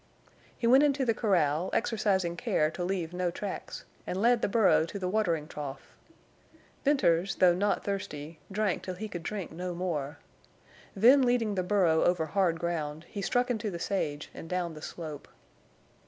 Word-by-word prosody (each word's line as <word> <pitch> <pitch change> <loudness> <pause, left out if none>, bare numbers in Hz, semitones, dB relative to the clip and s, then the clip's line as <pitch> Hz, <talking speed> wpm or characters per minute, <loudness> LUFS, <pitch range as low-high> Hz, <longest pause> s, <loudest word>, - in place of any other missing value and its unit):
He - - -3
went 255 +4 +7
into 280 -2 +2
the 230 - +3
corral, 180 -6 +1
exercising 200 -7 +1
care 155 -2 +1
to 175 - -4
leave 175 -2 -2
no 180 0 0
tracks, 190 +3 -6 0.2
and 185 - -2
led 235 +2 +4
the - - +2
burro 200 -5 +4
to 200 - -6
the 185 -2 -3
watering 175 -7 0
trough. 140 -4 -8 0.9
Venters, 195 - +2
though 180 -1 +5
not 200 +3 0
thirsty, 165 -6 -5
drank 205 -1 0
till 185 - -5
he 215 +4 -5
could 175 -4 -6
drink 195 +1 -5
no 175 +2 -5
more. 160 -5 -3 0.8
Then, 245 +8 +6
leading 245 -4 +2
the 190 - 0
burro 180 -4 +3
over 175 -2 +2
hard 170 0 +1
ground, 160 -2 -3
he 200 - -5
struck 245 +5 +1
into 220 -3 -2
the 175 - -5
sage 150 -5 -2
and 165 - -9
down 180 -2 -2
the 155 - -10
slope. 155 -2 -7
185 Hz, 170 wpm, -29 LUFS, 165-210 Hz, 0.9 s, went